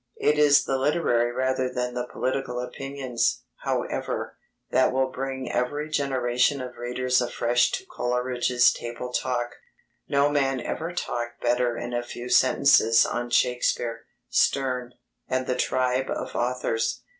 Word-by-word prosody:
It 150 Hz, 0 st, +2 dB
is 145 Hz, -1 st, +6 dB
the 135 Hz, -, 0 dB
literary 125 Hz, -5 st, +2 dB
rather 130 Hz, +1 st, 0 dB
than 125 Hz, 0 st, -2 dB
the 125 Hz, 0 st, -3 dB
political 130 Hz, -1 st, -2 dB
opinions, 130 Hz, 0 st, -2 dB
however, -, -, -3 dB, 0.4 s
that -, -, +4 dB
will 130 Hz, 0 st, 0 dB
bring 130 Hz, -1 st, -4 dB
every 145 Hz, +5 st, -1 dB
generation 130 Hz, -1 st, +1 dB
of 125 Hz, -1 st, -7 dB
readers 125 Hz, +1 st, 0 dB
afresh 120 Hz, 0 st, +2 dB
to 385 Hz, -, -3 dB
Coleridge's 125 Hz, -, +1 dB
Table 120 Hz, +1 st, -6 dB
Talk. 120 Hz, -2 st, -1 dB, 0.6 s
No 140 Hz, 0 st, +3 dB
man 135 Hz, -3 st, +1 dB
ever 165 Hz, +7 st, -4 dB
talked 120 Hz, -8 st, -4 dB
better 120 Hz, 0 st, +1 dB
in 120 Hz, 0 st, -5 dB
a 120 Hz, -, 0 dB
few 120 Hz, 0 st, -7 dB
sentences 125 Hz, -4 st, +5 dB
on 120 Hz, 0 st, -3 dB
Shakespeare, 120 Hz, -1 st, 0 dB, 0.2 s
Sterne, 125 Hz, -2 st, +1 dB, 0.3 s
and 130 Hz, 0 st, -1 dB
the 125 Hz, -, 0 dB
tribe 130 Hz, +1 st, 0 dB
of -, -, -4 dB
authors. 120 Hz, -2 st, -1 dB
125 Hz, 135 wpm, -25 LUFS, 120-135 Hz, 0.6 s, is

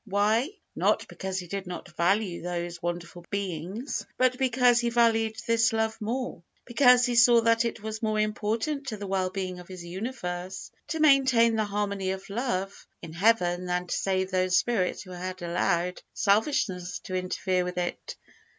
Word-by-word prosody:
Why? 215 Hz, +6 st, +2 dB, 0.3 s
Not -, -, +1 dB
because 190 Hz, 0 st, -5 dB
He 180 Hz, -, -4 dB
did 195 Hz, +1 st, -5 dB
not 180 Hz, 0 st, -8 dB
value 185 Hz, +1 st, +1 dB
those 175 Hz, 0 st, -4 dB
wonderful 175 Hz, 0 st, -5 dB
beings, 200 Hz, -, -3 dB
but 255 Hz, 0 st, +2 dB
because 250 Hz, -2 st, +4 dB
He 240 Hz, -1 st, +1 dB
valued 225 Hz, -2 st, +2 dB
this 230 Hz, -1 st, +3 dB
love 220 Hz, 0 st, -1 dB
more. 240 Hz, -3 st, -3 dB, 0.2 s
Because 250 Hz, 0 st, +5 dB
He 245 Hz, -, 0 dB
saw 235 Hz, 0 st, +6 dB
that 230 Hz, +1 st, +3 dB
it 230 Hz, -2 st, -4 dB
was 220 Hz, 0 st, -5 dB
more 215 Hz, -1 st, 0 dB
important 225 Hz, +7 st, -1 dB
to 220 Hz, -4 st, -3 dB
the 205 Hz, -, -6 dB
well 190 Hz, -1 st, 0 dB
being 185 Hz, -1 st, -4 dB
of 180 Hz, -, -12 dB
His 185 Hz, -2 st, -9 dB
universe 185 Hz, -2 st, -5 dB, 0.2 s
to 320 Hz, -, -3 dB
maintain 260 Hz, -6 st, +5 dB
the 215 Hz, -1 st, +1 dB
harmony 200 Hz, -2 st, -2 dB
of 190 Hz, +1 st, -5 dB
love 200 Hz, -4 st, -3 dB, 0.2 s
in 165 Hz, -1 st, -8 dB
Heaven 180 Hz, -2 st, +2 dB
than 180 Hz, 0 st, -1 dB
to 175 Hz, -, -2 dB
save 190 Hz, -1 st, 0 dB
those 185 Hz, 0 st, +2 dB
spirits 215 Hz, -7 st, 0 dB
who 185 Hz, -, -12 dB
had 185 Hz, 0 st, -6 dB
allowed 175 Hz, +1 st, 0 dB
selfishness 200 Hz, -4 st, +1 dB
to 185 Hz, -, -7 dB
interfere 185 Hz, 0 st, 0 dB
with 180 Hz, 0 st, -5 dB
it. 175 Hz, -1 st, -3 dB
200 Hz, 170 wpm, -27 LUFS, 180-230 Hz, 0.3 s, saw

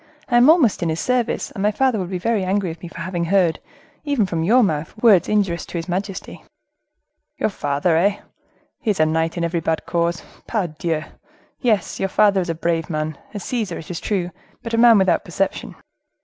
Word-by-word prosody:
I 240 Hz, -, +4 dB
am 245 Hz, +4 st, +6 dB
almost 315 Hz, -, +4 dB
in 170 Hz, -, 0 dB
his 160 Hz, +1 st, -2 dB
service, 250 Hz, -2 st, -1 dB
and 195 Hz, -, -6 dB
my 205 Hz, -, +3 dB
father 250 Hz, +1 st, +1 dB
would 180 Hz, -2 st, -4 dB
be 185 Hz, -, -2 dB
very 210 Hz, +2 st, 0 dB
angry 190 Hz, 0 st, 0 dB
with 165 Hz, 0 st, -8 dB
me 175 Hz, -, -7 dB
for 170 Hz, 0 st, -9 dB
having 170 Hz, -1 st, -2 dB
heard, 180 Hz, -2 st, +2 dB, 0.4 s
even 285 Hz, -8 st, +1 dB
from 170 Hz, -3 st, -2 dB
your 240 Hz, +8 st, +5 dB
mouth, 155 Hz, -5 st, -2 dB
words 215 Hz, -6 st, +5 dB
injurious 195 Hz, -5 st, +1 dB
to -, -, -5 dB
his 165 Hz, -, -4 dB
majesty." 190 Hz, +2 st, -5 dB, 0.9 s
"Your -, -, 0 dB
father, 145 Hz, 0 st, 0 dB
eh! 200 Hz, +4 st, +2 dB, 0.6 s
He 230 Hz, -, -3 dB
is 200 Hz, -, 0 dB
a 155 Hz, -, +5 dB
knight 160 Hz, +2 st, 0 dB
in 170 Hz, -, -1 dB
every 170 Hz, 0 st, 0 dB
bad 160 Hz, 0 st, -2 dB
cause. 170 Hz, 0 st, -1 dB, 0.2 s
Pardieu! 165 Hz, -6 st, -2 dB, 0.6 s
yes, 220 Hz, -6 st, 0 dB
your 195 Hz, -, 0 dB
father 200 Hz, -1 st, +3 dB
is 175 Hz, -, -4 dB
a 165 Hz, -, -1 dB
brave 165 Hz, -1 st, -1 dB
man, 155 Hz, -1 st, -2 dB, 0.2 s
a -, -, -2 dB
Caesar, 210 Hz, -3 st, -3 dB
it 165 Hz, -, -8 dB
is 170 Hz, -, -4 dB
true—but 190 Hz, +4 st, -5 dB
a -, -, +2 dB
man 235 Hz, -2 st, +7 dB
without 190 Hz, -3 st, +2 dB
perception." 190 Hz, +2 st, -3 dB
185 Hz, 205 wpm, -21 LUFS, 165-210 Hz, 0.9 s, man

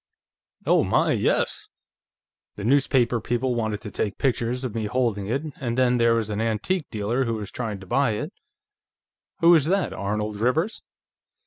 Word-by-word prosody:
"Oh -, -, +4 dB
my, -, -, +2 dB
yes! -, -, +1 dB, 0.9 s
The 100 Hz, -, -7 dB
newspaper 125 Hz, -2 st, +2 dB
people 125 Hz, +1 st, -1 dB
wanted 110 Hz, -3 st, -2 dB
to 105 Hz, -, -7 dB
take 105 Hz, 0 st, -2 dB
pictures 125 Hz, -1 st, 0 dB
of 125 Hz, -5 st, -3 dB
me 110 Hz, -2 st, -2 dB
holding 105 Hz, -4 st, 0 dB
it, 135 Hz, +7 st, -1 dB, 0.2 s
and 120 Hz, -2 st, -2 dB
then, 125 Hz, -1 st, +3 dB
there 115 Hz, 0 st, +4 dB
was 110 Hz, -2 st, -1 dB
an 105 Hz, +1 st, -2 dB
antique 115 Hz, -, -1 dB
dealer 115 Hz, +4 st, -1 dB
who 115 Hz, -1 st, -1 dB
was 105 Hz, -3 st, -5 dB
here -, -, -16 dB
trying 110 Hz, -5 st, -3 dB
to -, -, -10 dB
buy 120 Hz, +2 st, +2 dB
it." 105 Hz, -, -4 dB, 1.1 s
"Who 170 Hz, +1 st, +7 dB
was 160 Hz, -5 st, +5 dB
that 190 Hz, +3 st, +1 dB
Arnold 105 Hz, +1 st, -3 dB
Rivers?" 140 Hz, -, 0 dB
115 Hz, 175 wpm, -24 LUFS, 105-130 Hz, 1.1 s, Who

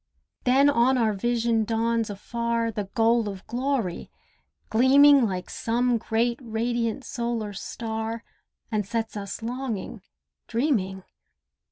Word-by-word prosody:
Then 265 Hz, +3 st, +5 dB
on 260 Hz, -1 st, +4 dB
our 225 Hz, -3 st, +2 dB
vision 230 Hz, +1 st, +1 dB
dawns 225 Hz, 0 st, 0 dB
afar 230 Hz, +3 st, -2 dB
The 210 Hz, -2 st, -3 dB
goal 230 Hz, -1 st, +3 dB
of 195 Hz, -1 st, -8 dB
glory, 245 Hz, -7 st, -2 dB, 0.6 s
gleaming 270 Hz, +2 st, +6 dB
Like 185 Hz, -2 st, -4 dB
some 240 Hz, +1 st, 0 dB
great 235 Hz, +2 st, 0 dB
radiant 230 Hz, +1 st, -2 dB
solar 235 Hz, -3 st, -3 dB
star, 225 Hz, +2 st, -4 dB, 0.5 s
And 215 Hz, -1 st, +1 dB
sets 225 Hz, +2 st, -3 dB
us 200 Hz, +2 st, -6 dB
longing, 240 Hz, -4 st, -4 dB, 0.5 s
dreaming. 220 Hz, -7 st, 0 dB
230 Hz, 115 wpm, -26 LUFS, 220-240 Hz, 0.6 s, gleaming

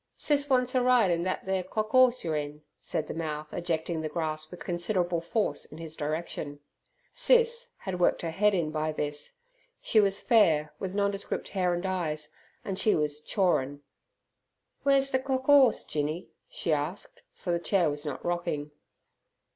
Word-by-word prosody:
"Sis 290 Hz, -1 st, +1 dB
wants 250 Hz, -1 st, +2 dB
er 255 Hz, -, +4 dB
ride 245 Hz, -6 st, +4 dB
in 170 Hz, 0 st, 0 dB
thet 185 Hz, -, -2 dB
ther 190 Hz, 0 st, 0 dB
cock 215 Hz, +4 st, -3 dB
'orse 255 Hz, -1 st, +5 dB
yer 160 Hz, -2 st, -1 dB
in," 150 Hz, 0 st, -4 dB, 0.2 s
said 155 Hz, -, -2 dB
the -, -, -5 dB
mouth, 155 Hz, -2 st, -5 dB
ejecting 165 Hz, -1 st, -2 dB
the 155 Hz, -, -3 dB
grass 155 Hz, -1 st, -1 dB
with 180 Hz, -, -9 dB
considerable 175 Hz, -1 st, 0 dB
force 205 Hz, +6 st, +1 dB
in 155 Hz, -, -9 dB
his 160 Hz, -1 st, -6 dB
direction. 150 Hz, -1 st, -4 dB, 0.5 s
"Sis" 485 Hz, -1 st, +3 dB
had 185 Hz, -2 st, -5 dB
worked 175 Hz, -, +2 dB
her 165 Hz, -, -2 dB
head 205 Hz, +4 st, +2 dB
in 165 Hz, -4 st, -1 dB
by 155 Hz, 0 st, -1 dB
this. 150 Hz, -, -4 dB, 0.4 s
She 220 Hz, -, +3 dB
was 200 Hz, -1 st, +3 dB
fair, 160 Hz, -, +3 dB
with 190 Hz, 0 st, -4 dB
nondescript 200 Hz, 0 st, -1 dB
hair 180 Hz, -3 st, 0 dB
and 175 Hz, +2 st, -4 dB
eyes, 160 Hz, -5 st, -2 dB, 0.4 s
and 190 Hz, -1 st, -3 dB
she 215 Hz, -, +3 dB
was 150 Hz, -1 st, -1 dB
"chawrin'". 145 Hz, -6 st, 0 dB, 1.0 s
"Wer's 275 Hz, -1 st, +3 dB
ther 260 Hz, -, +2 dB
cock 260 Hz, 0 st, -2 dB
'orse, 275 Hz, -5 st, +6 dB
Jinny?" 155 Hz, +3 st, -3 dB, 0.2 s
she 165 Hz, -, -1 dB
asked, 150 Hz, +6 st, -4 dB
for 175 Hz, -, -4 dB
the 170 Hz, -, +1 dB
chair 180 Hz, -1 st, +2 dB
was 145 Hz, 0 st, -2 dB
not 150 Hz, -, -5 dB
rocking. 170 Hz, -4 st, -2 dB
175 Hz, 170 wpm, -28 LUFS, 155-215 Hz, 1.0 s, orse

